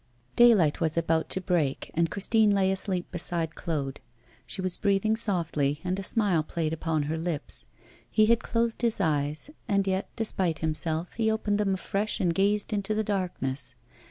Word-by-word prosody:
Daylight 210 -12 +5
was 160 0 +1
about 165 -1 +1
to 190 - 0
break, 170 -7 -1
and 165 0 +1
Christine 215 +2 +2
lay 195 -2 +3
asleep 190 -2 -1
beside 170 -2 -1
Claude. 145 -7 -3 0.5
She 125 - -4
was 185 -1 0
breathing 200 +2 +2
softly, 165 -9 +1
and 185 +1 -1
a - - -4
smile 195 -6 +1
played 155 0 -2
upon 160 -1 -1
her 160 +2 -2
lips. 165 -3 -4 0.4
He 215 - +4
had 230 +1 +3
closed 230 0 -1
his 235 -2 +1
eyes; 150 - 0 0.2
and 200 -3 +2
yet, 190 0 -1
despite 190 -7 0
himself, 160 +2 -1
he 225 -1 +1
opened 210 -1 0
them 195 -2 +1
afresh 200 +3 -2
and 175 -3 +1
gazed 205 +4 +1
into 205 +1 -1
the 220 - +1
darkness. 175 -11 -2
185 Hz, 170 wpm, -27 LUFS, 160-210 Hz, 0.5 s, Daylight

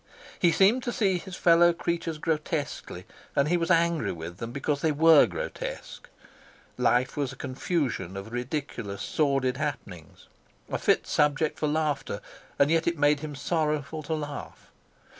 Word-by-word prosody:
He 175 - +4
seemed 205 +9 +4
to 240 - -3
see 195 -7 +1
his 185 0 -8
fellow 170 0 +5
creatures 170 -1 -2
grotesquely, 150 - -3 0.3
and 140 +2 +2
he 175 - +3
was 170 -1 -1
angry 170 -2 +2
with 85 +1 -7
them 115 +3 -6
because 140 +2 -2
they 160 - +2
were 155 0 +6
grotesque; - - -6 0.7
life 125 +2 +2
was 140 -3 -1
a - - -10
confusion 130 - -2
of 100 +3 -7
ridiculous, 120 -5 -4
sordid 135 -4 +1
happenings, 90 - -6 0.4
a - - -1
fit - - +2
subject 150 +1 +1
for 155 - 0
laughter, 150 -1 -1 0.4
and 140 +2 +4
yet 165 0 +2
it 170 -1 +1
made 145 0 +3
him 150 -1 -6
sorrowful 150 0 -1
to 160 +2 -2
laugh. 145 -2 -7
150 Hz, 155 wpm, -27 LUFS, 135-165 Hz, 0.7 s, were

